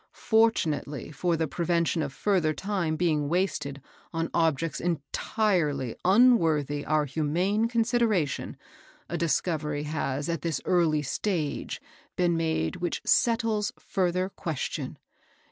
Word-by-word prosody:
Fortunately 165 - +1
for 170 +3 0
the 160 0 0
prevention 170 0 0
of 145 -3 -2
further 165 -2 +1
time 190 -6 -1
being 155 -4 +1
wasted 170 -6 -1 0.3
on 165 0 -2
objects 165 -2 +1
entirely 160 - 0
unworthy 165 - +4
our 155 -1 +1
humane 175 - 0
consideration, 230 - 0 0.5
a - - -3
discovery 155 -3 0
has 145 -2 -2
at 165 -3 -2
this 165 -3 -1
early 160 -4 +2
stage 155 +2 -2 0.4
been 175 -1 +2
made 160 - -1
which 175 -1 -3
settles 225 -3 +2
further 185 -1 0
question. 160 -7 -4
165 Hz, 110 wpm, -27 LUFS, 150-190 Hz, 0.5 s, unworthy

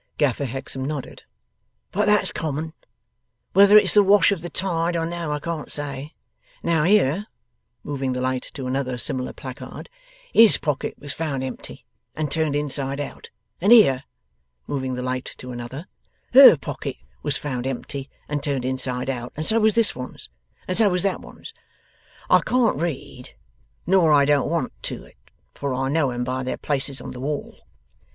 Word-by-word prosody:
Gaffer 140 -2 +1
Hexam 135 +1 -4
nodded. 145 -2 -6 0.7
'But 210 +2 0
that's 210 0 +3
common. 155 +1 -4 0.8
Whether 200 +1 +8
it's 210 - +5
the 210 - +7
wash 200 0 +5
of 195 -5 -2
the 175 - -6
tide 170 -2 -1
or 165 - -1
no, 170 -2 -4
I 150 - 0
can't 160 0 -4
say. 145 0 -3 0.5
Now, 165 -3 +2
here,' 195 0 +3 0.6
moving 135 -3 -2
the 125 - -3
light 130 0 -1
to 135 - -5
another 130 -1 -2
similar 125 +1 0
placard, 130 - -9 0.4
'HIS 225 -2 +7
pockets 145 -1 -3
was 145 -1 -1
found 145 -5 -3
empty, 130 -1 -8 0.3
and 155 -2 -2
turned 155 -3 0
inside 140 -1 -2
out. 145 - -7 0.3
And 200 +5 +3
here,' 140 - +6 0.6
moving 130 -2 -3
the 125 - -4
light 130 0 -3
to 125 - -8
another, 120 +6 -7 0.5
'HER 265 - +10
pocket - - -5 0.3
was 145 - 0
found 130 -3 -4
empty, 135 +1 -5 0.2
and 145 -1 -2
turned 140 -4 -2
inside 130 -1 -2
out. 125 -2 -4
And 155 - -3
so 225 +5 +3
was 220 -1 +3
this 230 -2 +3
one's. 125 0 -8 0.4
And 185 - -1
so 215 -1 +5
was 180 -1 0
that 195 -2 -1
one's. - - -11 0.7
I - - +6
can't 235 - +1
read, 135 -6 -5 0.5
nor 175 -3 +4
I 145 -1 +5
don't 145 -1 +2
want 165 -6 -1
to - - -5
it, - - -19 0.4
for 140 -2 -3
I 135 +1 -1
know 150 -1 +2
'em 125 0 -3
by 130 +1 -2
their 130 - -3
places 140 -2 -2
on - - -7
the 125 - -9
wall. 145 +2 -4
145 Hz, 175 wpm, -23 LUFS, 130-170 Hz, 0.8 s, HER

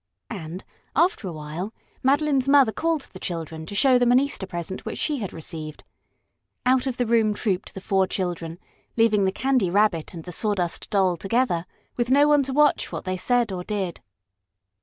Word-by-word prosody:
And, 180 -3 -6 0.3
after 330 - +2
a - - -4
while, 160 +7 -6 0.3
Madeline's 275 0 +2
mother 275 -5 +6
called 320 +6 0
the 185 - -9
children 160 -3 -5
to 205 - -6
show 255 +2 +5
them 245 0 +3
an 250 - +6
Easter 275 -8 -2
present 175 +1 -5
which - - -5
she 295 -3 -1
had 200 -5 -4
received. 155 -2 -7 0.8
Out 255 +1 +3
of 255 -2 -2
the 245 - +1
room 225 -2 +2
trooped 195 -4 -2
the 190 - -6
four 190 -1 +1
children, 175 -3 -3 0.4
leaving 215 -3 +4
the 190 - +2
Candy 255 -2 +1
Rabbit 190 -4 +1
and 165 - -7
the 180 - -8
Sawdust 180 -3 -1
Doll 190 -3 +2
together, 195 -3 0 0.3
with 240 0 0
no 285 +3 +5
one 295 -1 +5
to 270 0 -2
watch 295 +2 +3
what - - -5
they 185 0 -1
said 240 +3 +1
or 180 -1 -4
did. 195 -4 -3
205 Hz, 185 wpm, -24 LUFS, 180-255 Hz, 0.8 s, mother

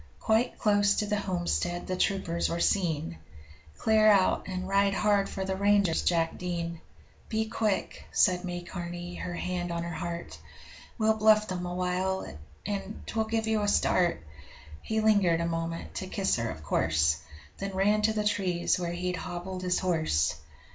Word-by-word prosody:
Quite 225 +3 +1
close 205 -2 +3
to 210 - 0
the 210 0 0
homestead 175 -2 -1
the 185 - -2
troopers 180 -3 0
were 170 - -2
seen. 160 - 0 0.6
'Clear 220 -1 +4
out 200 -3 +4
and 185 -1 -4
ride 195 0 +2
hard 205 -1 +2
for 190 - -4
the 190 0 -1
ranges, 200 -3 +3
Jack 165 -2 +1
Dean! 170 -2 -3 0.5
Be 220 0 0
quick!' 215 -2 -1
said 180 -1 +3
May 175 -1 -4
Carney 175 0 -6
her 175 - -4
hand 175 0 -3
on 170 0 -2
her 170 0 -5
heart 170 0 -5 0.6
'We'll 220 -1 +2
bluff 215 0 +5
them 180 -1 -3
awhile, 180 +1 -1 0.4
and 205 +1 -4
'twill 220 -1 -1
give 225 0 -1
you 220 -1 +1
a 205 - 0
start.' 175 - +2 0.6
He 220 0 -1
lingered 200 -6 +4
a 170 - 0
moment 165 0 -3
to 190 - -4
kiss 190 0 0
her, 115 -1 -2
of 80 -4 -7
course 80 0 +2 0.4
Then 195 -1 -4
ran 205 +3 +3
to 220 +1 +2
the 210 -1 -1
trees 185 -5 +1
where 175 -1 -2
he'd 180 +1 -2
hobbled 180 +1 -5
his 180 0 +1
horse. 155 - +1
185 Hz, 170 wpm, -29 LUFS, 175-205 Hz, 0.6 s, bluff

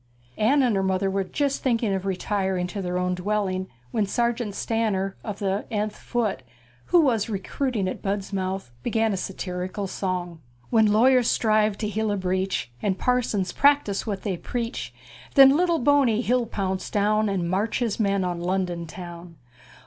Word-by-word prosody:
Anne 270 +6 +4
and 240 -4 +2
her 195 - +1
mother 190 0 0
were 195 0 0
just 280 +7 -1
thinking 230 -5 +1
of 190 0 -2
retiring 190 -1 -1
to 190 +3 -5
their 180 -1 -2
own 180 0 0
dwelling 190 0 -1 0.2
when 220 - +1
Sergeant 235 -1 -1
Stanner 205 -4 -1
of 210 -2 -5
the 195 0 -1
th 215 -2 -1
Foot, 220 - -2 0.4
who 350 - +5
was 230 -7 +1
recruiting 215 +1 -2
at 185 - -4
Budmouth, 195 -5 -3
began 225 - +1
a - - 0
satirical 185 +1 -4
song: 180 -3 -3 0.3
When 220 -2 +5
law' 215 +3 +4
yers 255 -2 +5
strive' 215 -2 +2
to 215 - -2
heal' 220 +1 -1
a 205 - 0
breach', 185 -7 -1
And 195 -2 0
par 250 +5 +2
sons 195 -6 -2
prac' 285 0 +4
tise 200 +2 -3
what' 200 -3 -3
they 190 -4 -2
preach'; 230 - -4 0.4
Then 270 0 +8
lit' 360 +3 +3
tle 340 -1 +2
Bo 285 +1 +4
ney 230 -3 +2
he'll 245 -1 +1
pounce 190 -3 -3
down', 215 +1 +2
And 185 -3 -1
march' 200 +5 0
his 235 -4 -1
men' 200 -2 +1
on 175 -1 -2
Lon' 185 +2 0
don 170 -1 -5
town'! 175 0 -9
200 Hz, 185 wpm, -25 LUFS, 185-230 Hz, 0.4 s, Then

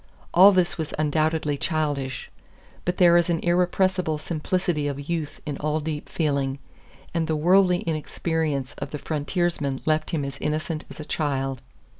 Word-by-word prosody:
All 190 +4 +9
this 180 -2 +1
was 155 - -3
undoubtedly 155 -1 +1
childish 145 -4 -2 0.5
but 180 0 -1
there 175 -1 +6
is 175 0 +2
an 170 - +2
irrepressible 180 -1 +1
simplicity 155 0 -1
of 140 0 -5
youth 165 -3 -3
in 145 -3 -4
all 155 +1 0
deep 150 -1 -4
feeling, 140 -4 0 0.6
and 165 -2 0
the 160 - +1
worldly 180 +3 +4
inexperience 155 -3 -2
of - - -4
the 150 - -4
frontiersman 150 -2 -1
left 155 0 +1
him 150 -4 -1
as 140 0 -6
innocent 155 +1 -2
as - - -11
a 155 - -6
child. 135 -5 -1
155 Hz, 155 wpm, -25 LUFS, 145-175 Hz, 0.6 s, All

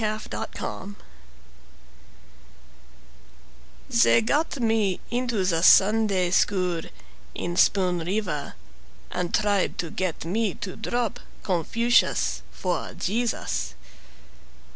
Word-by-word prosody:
Yee 215 0 0
Bow 200 +1 -5 2.9
They 230 -2 +5
got 290 +5 0
me 220 -5 +1
into 240 -5 0
the 165 -3 +1
Sunday 195 -1 +5
school 180 -3 +1 0.5
In 175 0 -3
Spoon 180 -1 +3
River 180 -3 -3 0.6
And 180 -1 -2
tried 205 -2 +1
to 165 -3 -3
get 185 -4 -3
me 205 +2 -1
to 185 - -6
drop 240 +1 -2 0.2
Confucius 170 - +1
for 60 - -3
Jesus. 175 - -2
195 Hz, 90 wpm, -25 LUFS, 175-225 Hz, 2.9 s, They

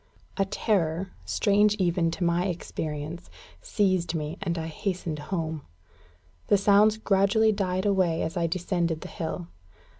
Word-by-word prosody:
A 195 - +2
terror 190 -3 0
strange 205 - +3
even 175 -4 +1
to 170 +3 -3
my 175 +2 +2
experience 160 -2 -5 0.3
seized 185 -5 0
me, 155 +1 -3
and 175 -3 -2
I 160 - -3
hastened 165 -1 -3
home. 160 -4 -2 0.9
The 205 - +5
sounds 205 +2 +5
gradually 215 +1 +3
died 190 -2 -1
away 185 -5 +2
as 160 - -3
I 170 -2 +1
descended 170 -2 -1
the - - -8
hill. 170 +1 -4
180 Hz, 140 wpm, -27 LUFS, 165-200 Hz, 0.9 s, The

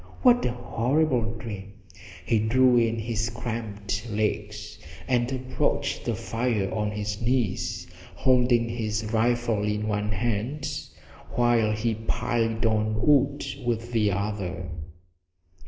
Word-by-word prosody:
What 245 -2 +6
a 125 - +1
horrible 120 0 0
dream! 105 -3 -7 0.5
He 115 +2 +3
drew 125 +3 +4
in 115 -1 +3
his 115 0 -1
cramped 110 -2 -4
legs 105 0 -2 0.3
and 125 -1 +1
approached 130 -1 -1
the - - 0
fire 115 -4 -1
on 105 -1 0
his 105 0 -3
knees, 115 -5 0 0.3
holding 125 -2 +3
his 110 -1 -2
rifle 115 -1 +2
in 105 +1 -1
one 105 0 0
hand 120 +7 -1 0.7
while 120 -2 +3
he 110 +2 0
piled 115 +1 -1
on 110 -1 +1
wood 145 -1 +3 0.2
with 120 0 -1
the 110 -3 +2
other. 95 -2 -3
115 Hz, 120 wpm, -26 LUFS, 105-120 Hz, 0.7 s, What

